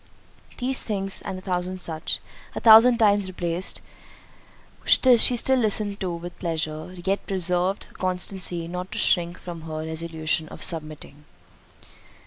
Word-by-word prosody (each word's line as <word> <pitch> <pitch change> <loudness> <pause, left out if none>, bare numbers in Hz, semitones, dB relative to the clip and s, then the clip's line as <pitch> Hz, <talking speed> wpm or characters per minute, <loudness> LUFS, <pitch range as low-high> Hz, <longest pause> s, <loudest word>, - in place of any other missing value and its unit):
These 260 +1 -1
things, 195 -3 -3
and 190 -1 -5
a 185 - -10
thousand 185 0 -3
such, 160 -2 -3 0.4
a - - -2
thousand 230 +2 +8
times 205 -3 +3
repeated, 175 0 -2 1.0
she 245 -1 +5
still 265 +2 +3
listened 210 -2 +1
to 185 -3 -2
with 175 +1 -9
pleasure; 155 -1 -3
yet 195 +1 -1
preserved 185 0 -1
the - - -22
constancy 180 -2 -3
not 180 +2 -6
to - - -5
shrink 175 -4 +2
from 170 -2 -8
her 155 0 -5
resolution 160 -1 -2
of - - -9
submitting. 155 -3 -4
180 Hz, 135 wpm, -24 LUFS, 165-200 Hz, 1.0 s, thousand